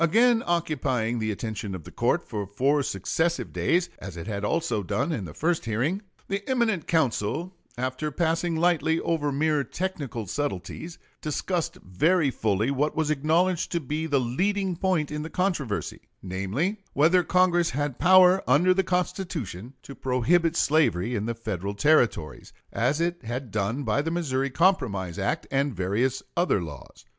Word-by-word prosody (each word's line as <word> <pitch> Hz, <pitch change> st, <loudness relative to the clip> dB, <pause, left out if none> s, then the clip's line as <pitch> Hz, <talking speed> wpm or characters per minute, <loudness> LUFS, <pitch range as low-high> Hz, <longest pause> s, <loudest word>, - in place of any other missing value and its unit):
Again 235 Hz, +4 st, +4 dB
occupying 130 Hz, -9 st, 0 dB
the 110 Hz, 0 st, -1 dB
attention 105 Hz, -1 st, -4 dB
of 85 Hz, -, -8 dB
the -, -, -11 dB
court -, -, +1 dB
for 105 Hz, -2 st, -5 dB
four 135 Hz, +9 st, +2 dB
successive 160 Hz, -, -1 dB
days, 175 Hz, +1 st, +1 dB
as 95 Hz, -3 st, -8 dB
it 85 Hz, -, -6 dB
had 100 Hz, -1 st, -4 dB
also 120 Hz, -2 st, 0 dB
done 100 Hz, -, -1 dB
in 110 Hz, -, -3 dB
the 75 Hz, -, -9 dB
first 165 Hz, -2 st, 0 dB
hearing, 130 Hz, -, 0 dB, 0.3 s
the 195 Hz, +1 st, -2 dB
eminent 230 Hz, -, +1 dB
counsel, 160 Hz, -, 0 dB, 0.2 s
after 130 Hz, +4 st, -2 dB
passing 165 Hz, +2 st, 0 dB
lightly 160 Hz, -1 st, +2 dB
over 150 Hz, -3 st, 0 dB
mere 150 Hz, +1 st, +1 dB
technical 140 Hz, -, -4 dB
subtleties, 145 Hz, -, -4 dB, 0.2 s
discussed 165 Hz, +2 st, -2 dB
very 150 Hz, -, +2 dB
fully 110 Hz, +2 st, 0 dB
what 145 Hz, +2 st, 0 dB
was 155 Hz, -1 st, +1 dB
acknowledged 165 Hz, +5 st, +1 dB
to 170 Hz, -, +1 dB
be 155 Hz, +2 st, -3 dB
the 145 Hz, -3 st, +2 dB
leading 185 Hz, +10 st, 0 dB
point 170 Hz, -5 st, 0 dB
in 150 Hz, 0 st, -3 dB
the 155 Hz, -, -5 dB
controversy; 165 Hz, -, -2 dB, 0.2 s
namely, 100 Hz, -, -2 dB, 0.2 s
whether 165 Hz, +6 st, +4 dB
Congress 175 Hz, -1 st, +3 dB
had 145 Hz, -1 st, -2 dB
power 185 Hz, +1 st, +6 dB
under 160 Hz, +9 st, +5 dB
the 190 Hz, -, +2 dB
Constitution 170 Hz, -, -3 dB
to 140 Hz, -, -9 dB
prohibit 155 Hz, +7 st, +1 dB
slavery 125 Hz, -, +2 dB
in 110 Hz, -1 st, -2 dB
the 115 Hz, -, -2 dB
Federal 100 Hz, -3 st, -4 dB
Territories, 115 Hz, -, +1 dB, 0.2 s
as 135 Hz, +6 st, +1 dB
it 175 Hz, +1 st, -1 dB
had 120 Hz, +1 st, -5 dB
done 110 Hz, +7 st, -1 dB
by 115 Hz, +3 st, +1 dB
the 160 Hz, -, -2 dB
Missouri 140 Hz, -6 st, -1 dB
Compromise 125 Hz, -, +1 dB
act -, -, -1 dB
and 140 Hz, -1 st, 0 dB
various 105 Hz, +8 st, 0 dB
other 175 Hz, -, +2 dB
laws. 75 Hz, -6 st, -9 dB
145 Hz, 160 wpm, -26 LUFS, 115-170 Hz, 0.3 s, power